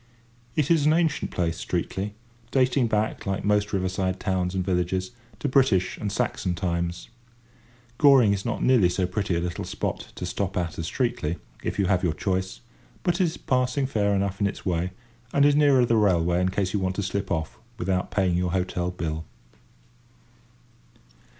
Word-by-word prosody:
It 155 Hz, 0 st, +1 dB
is 155 Hz, -3 st, +4 dB
an 155 Hz, -, +5 dB
ancient 160 Hz, -3 st, +1 dB
place, 85 Hz, -1 st, -1 dB
Streatley, 95 Hz, +3 st, -2 dB, 0.4 s
dating 130 Hz, -1 st, +2 dB
back, 110 Hz, -1 st, -1 dB
like 95 Hz, 0 st, -2 dB
most 105 Hz, 0 st, +2 dB
river 95 Hz, -2 st, 0 dB
side 95 Hz, 0 st, -1 dB
towns 95 Hz, -1 st, -1 dB
and 95 Hz, -1 st, -1 dB
villages, 95 Hz, +1 st, -1 dB, 0.3 s
to -, -, -2 dB
British 130 Hz, -9 st, +3 dB
and 105 Hz, -, -2 dB
Saxon 105 Hz, -5 st, -1 dB
times. 85 Hz, -1 st, -2 dB, 0.9 s
Goring 135 Hz, -8 st, +6 dB
is 100 Hz, -1 st, -2 dB
not 120 Hz, -, -2 dB
nearly 120 Hz, -9 st, +5 dB
so 90 Hz, +1 st, 0 dB
pretty 90 Hz, 0 st, -1 dB
a -, -, +1 dB
little 85 Hz, 0 st, -3 dB
spot -, -, -4 dB
to -, -, -5 dB
stop 95 Hz, +2 st, -2 dB
at 85 Hz, -3 st, -2 dB
as 80 Hz, -, -3 dB
Streatley, 90 Hz, -, -1 dB, 0.2 s
if -, -, -3 dB
you 100 Hz, -, +2 dB
have 95 Hz, 0 st, +1 dB
your 85 Hz, -4 st, +2 dB
choice; 95 Hz, +2 st, -2 dB, 0.4 s
but 175 Hz, +1 st, +1 dB
it -, -, +5 dB
is 165 Hz, -, -3 dB
passing 125 Hz, +1 st, 0 dB
fair 100 Hz, -5 st, +1 dB
enough 100 Hz, 0 st, -1 dB
in 100 Hz, -, +4 dB
its 100 Hz, -, -6 dB
way, 90 Hz, -1 st, 0 dB, 0.4 s
and 140 Hz, 0 st, +5 dB
is 145 Hz, 0 st, +5 dB
nearer 140 Hz, -4 st, +5 dB
the 115 Hz, -1 st, +2 dB
railway 90 Hz, -4 st, +3 dB
in 90 Hz, -, +2 dB
case 95 Hz, 0 st, -1 dB
you 105 Hz, -, +1 dB
want 95 Hz, 0 st, -1 dB
to 100 Hz, -, -2 dB
slip 95 Hz, +1 st, -2 dB
off 85 Hz, +6 st, -3 dB, 0.2 s
without 90 Hz, -2 st, -1 dB
paying 95 Hz, -3 st, +1 dB
your 90 Hz, 0 st, 0 dB
hotel 90 Hz, -1 st, -1 dB
bill. 80 Hz, -3 st, -4 dB
95 Hz, 180 wpm, -25 LUFS, 90-115 Hz, 0.9 s, Goring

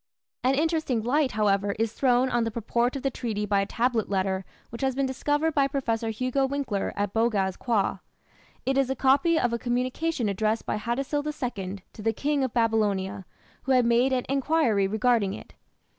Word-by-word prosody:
An 260 Hz, +2 st, +3 dB
interesting 310 Hz, -6 st, 0 dB
light, 270 Hz, +3 st, +1 dB
however, 200 Hz, -1 st, +1 dB
is 225 Hz, 0 st, -1 dB
thrown 255 Hz, -1 st, +3 dB
on 240 Hz, -2 st, +1 dB
the 225 Hz, -, -1 dB
purport 235 Hz, +3 st, -1 dB
of 275 Hz, -, -5 dB
the 270 Hz, -, 0 dB
treaty 220 Hz, -5 st, -3 dB
by 200 Hz, -1 st, +2 dB
a 195 Hz, -, -2 dB
tablet 235 Hz, -1 st, 0 dB
letter 190 Hz, -1 st, -1 dB, 0.3 s
which 235 Hz, -, -7 dB
has 265 Hz, -1 st, 0 dB
been 275 Hz, 0 st, +1 dB
discovered 290 Hz, +4 st, 0 dB
by 280 Hz, -2 st, +3 dB
Professor 230 Hz, -5 st, -1 dB
Hugo 255 Hz, +4 st, 0 dB
Winckler 265 Hz, -8 st, -2 dB
at 205 Hz, -1 st, -2 dB
Boghaz 210 Hz, -5 st, +1 dB
Köi. 215 Hz, -5 st, 0 dB, 0.7 s
It 270 Hz, +1 st, +2 dB
is 270 Hz, -1 st, +1 dB
a 265 Hz, -, 0 dB
copy 280 Hz, +6 st, +3 dB
of 240 Hz, -1 st, 0 dB
a 235 Hz, -, -1 dB
communication 250 Hz, +3 st, -1 dB
addressed 215 Hz, +3 st, 0 dB
by 210 Hz, -, -2 dB
Hattusil 275 Hz, +6 st, -2 dB
II 215 Hz, -11 st, -4 dB
to -, -, -10 dB
the 225 Hz, +1 st, +1 dB
King 285 Hz, +4 st, 0 dB
of 260 Hz, -, -1 dB
Babylonia, 205 Hz, -4 st, 0 dB, 0.4 s
who 265 Hz, -, +2 dB
had 250 Hz, -2 st, +4 dB
made 240 Hz, +3 st, +3 dB
an 255 Hz, -1 st, 0 dB
enquiry 270 Hz, -7 st, +2 dB
regarding 220 Hz, -1 st, +1 dB
it. -, -, -12 dB
240 Hz, 190 wpm, -26 LUFS, 210-270 Hz, 0.7 s, had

